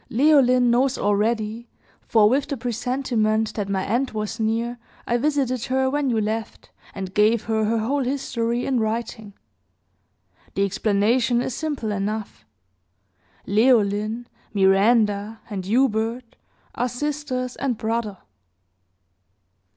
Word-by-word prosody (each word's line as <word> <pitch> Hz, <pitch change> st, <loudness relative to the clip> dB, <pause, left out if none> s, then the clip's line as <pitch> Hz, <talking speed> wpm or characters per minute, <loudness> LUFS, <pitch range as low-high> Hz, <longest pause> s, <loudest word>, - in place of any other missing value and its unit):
Leoline 255 Hz, -2 st, +4 dB
knows 255 Hz, +2 st, +2 dB
already; 215 Hz, +2 st, -1 dB, 0.3 s
for, 215 Hz, -2 st, +4 dB
with 270 Hz, +5 st, +1 dB
the 280 Hz, -, -3 dB
presentiment 235 Hz, -2 st, -1 dB
that 205 Hz, -2 st, -3 dB
my 190 Hz, -1 st, -1 dB
end 245 Hz, +5 st, 0 dB
was 215 Hz, +1 st, -4 dB
near, 230 Hz, +2 st, -1 dB, 0.3 s
I 240 Hz, -, +1 dB
visited 255 Hz, -3 st, 0 dB
her 260 Hz, 0 st, +1 dB
when 290 Hz, -1 st, 0 dB
you 230 Hz, -2 st, +1 dB
left, 220 Hz, +1 st, -4 dB, 0.2 s
and 190 Hz, -1 st, -6 dB
gave 215 Hz, +2 st, +3 dB
her 220 Hz, -1 st, 0 dB
her 225 Hz, +2 st, +1 dB
whole 265 Hz, +6 st, 0 dB
history, 245 Hz, -2 st, -2 dB
in 260 Hz, -3 st, +1 dB
writing. 220 Hz, -2 st, -3 dB, 1.2 s
The 195 Hz, -, +2 dB
explanation 220 Hz, +5 st, +1 dB
is 250 Hz, -, -2 dB
simple 285 Hz, -7 st, -3 dB
enough. 200 Hz, -, -4 dB, 1.0 s
Leoline, 215 Hz, 0 st, +2 dB, 0.3 s
Miranda, 205 Hz, +2 st, +3 dB
and 190 Hz, -3 st, -4 dB
Hubert, 230 Hz, 0 st, 0 dB, 0.4 s
are 250 Hz, -, -1 dB
sisters 255 Hz, -1 st, -3 dB
and 255 Hz, -5 st, -1 dB
brother." 220 Hz, -3 st, -2 dB
230 Hz, 120 wpm, -23 LUFS, 215-255 Hz, 1.2 s, Leoline